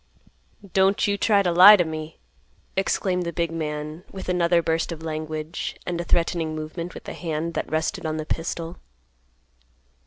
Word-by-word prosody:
"Don't 195 +1 +3
you 205 - +1
try 200 0 +3
to 180 - +1
lie 185 +5 +10
to 180 - +3
me!" 155 0 -6 0.6
exclaimed 190 -1 0
the 170 - -3
big 170 -1 -1
man, 155 0 -4
with 190 -1 -7
another 175 -1 +3
burst 160 +1 0
of 160 -1 -7
language, 155 0 -4
and 175 -1 -2
a - - -4
threatening 165 -2 0
movement 160 +3 -6
with - - -9
the - - -7
hand 165 0 -3
that - - -3
rested 155 +1 -1
on 155 -1 -2
the 155 - -4
pistol. 165 +2 -4
165 Hz, 165 wpm, -24 LUFS, 155-180 Hz, 0.6 s, lie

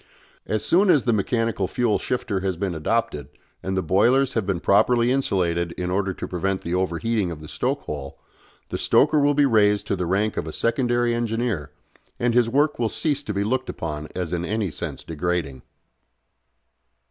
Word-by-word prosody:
As 110 0 -1
soon 185 - +4
as 150 -7 +5
the 120 - +2
mechanical 110 -1 0
fuel 120 -1 0
shifter 110 -6 -2
has 95 -2 -2
been 95 -1 -2
adopted, 80 - -1 0.3
and 95 0 -3
the 95 - 0
boilers 120 - +3
have 110 -5 -1
been 95 -4 0
properly 120 +6 +3
insulated 85 -10 0
in 90 0 -3
order 95 0 0
to - - -6
prevent 95 +2 -2
the 85 - -4
overheating 95 +3 0
of 85 -3 -6
the 75 - -10
stoke - - -2
hole, 70 -2 -7 0.5
the - - -3
stoker 150 +1 +4
will 145 0 +3
be 145 0 +4
raised 105 -5 +3
to - - -1
the 90 -2 -3
rank 100 +4 0
of - - -2
a - - -4
secondary 120 0 +1
engineer, 115 - -1 0.5
and 120 0 +1
his 120 -1 +3
work 145 +3 +1
will 115 -2 +1
cease 145 +1 -1
to 125 - -5
be 100 - +1
looked 130 +5 -1
upon 75 -2 -5
as 90 -2 -3
in 85 -1 -1
any 105 0 -1
sense - - -6
degrading. 80 -5 -3
105 Hz, 185 wpm, -23 LUFS, 90-120 Hz, 0.5 s, as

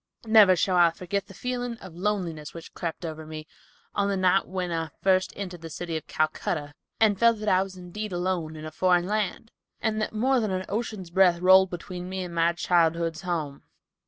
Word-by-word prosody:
Never 215 -4 +7
shall 180 +1 +1
I 175 -1 +6
forget 180 +4 -4
the 195 - -13
feeling 245 -1 -3
of 185 -6 -11
loneliness 175 -5 -3
which 165 - -10
crept 170 0 -5
over 160 -1 -6
me, 155 0 -8 0.5
on 200 0 +1
the 200 - 0
night 185 +1 +3
when 180 -1 -3
I 165 -1 -2
first 185 -1 +3
entered 180 -4 -6
the 165 - -7
city 165 +1 -5
of 160 - -5
Calcutta, 155 -1 -1 0.3
and 210 -3 +3
felt 230 -1 +5
that 215 0 -6
I 185 - +4
was 190 -1 -6
indeed 185 +4 -6
alone 175 -3 -2
in 155 0 -8
a 155 - -6
foreign 175 +2 +2
land, 215 +2 -2 0.3
and 220 -1 -1
that - - -1
more 255 +4 +2
than 215 -3 -1
an 185 0 -2
ocean's 210 -4 -4
breadth 180 -2 +4
rolled 190 +1 +6
between 180 0 -7
me 190 0 -3
and 175 -1 -7
my 170 0 +3
childhood's 170 -1 +1
home. 160 -6 -3
185 Hz, 205 wpm, -26 LUFS, 170-200 Hz, 0.5 s, Never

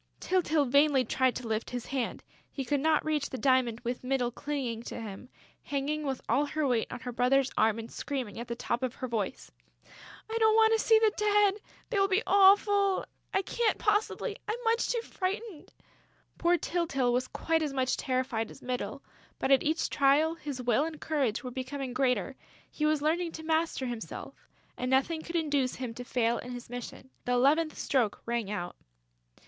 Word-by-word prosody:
Tyltyl 320 -5 +2
vainly 280 0 +4
tried 260 +2 +1
to 250 - -5
lift 220 0 -2
his 245 -1 -5
hand: 265 -3 -3 0.3
he 270 - -4
could 285 +3 +1
not 310 +2 +2
reach 300 -2 0
the 260 - -5
diamond 255 -4 +2
with 245 +1 -4
Mytyl 250 -2 0
clinging 255 -4 -3
to - - -6
him, 220 +2 -8 0.3
hanging 290 +2 -2
with 265 -2 -2
all 275 +6 +2
her 310 0 -1
weight 240 -3 0
on 245 - -6
her 250 - -5
brother's 255 +2 +2
arm 220 0 +3
and 230 0 -7
screaming 255 -7 -4
at 235 - -6
the 235 - -3
top 240 0 -2
of 255 -1 -2
her 255 - -4
voice: 220 -5 -3 0.8
"I 445 - -5
don't 440 -1 +5
want 445 0 +5
to 445 - +3
see 445 - +6
the 440 -1 +4
Dead!... 415 -1 +3 0.4
They 420 - +1
will 390 - +4
be 390 +3 +1
awful!... 400 0 +5 0.3
I 390 - +1
can't 455 +2 0
possibly!... 420 +1 0
I - - 0
am 480 +2 -7
much 460 0 +1
too 470 - 0
frightened!..." 395 -3 -4 0.7
Poor 345 +1 +3
Tyltyl 280 -9 0
was 255 +1 0
quite 325 -1 0
as 300 -2 -1
much 260 -1 0
terrified 255 -4 -1
as - - -13
Mytyl, 250 0 -4 0.3
but 270 - -1
at 270 - +6
each 315 +2 0
trial, 295 +3 +3
his 290 -6 -6
will 240 +3 +3
and 315 -1 -5
courage 275 -8 -1
were 250 - -5
becoming 260 0 -4
greater; 255 +1 0 0.4
he 305 - 0
was 305 -1 +1
learning 330 +2 0
to 320 - -7
master 320 -3 0
himself; 240 -3 -7 0.3
and 250 - -3
nothing 275 +5 +2
could 335 +2 -7
induce 290 -6 +1
him 250 -3 -5
to 245 - -7
fail 235 -1 0
in 250 0 -7
his 245 -1 -9
mission. 245 +1 -8
The 245 - +1
eleventh 300 +6 +3
stroke 240 -7 0
rang 235 -3 -2
out. 175 -4 -4
275 Hz, 195 wpm, -30 LUFS, 245-325 Hz, 0.8 s, see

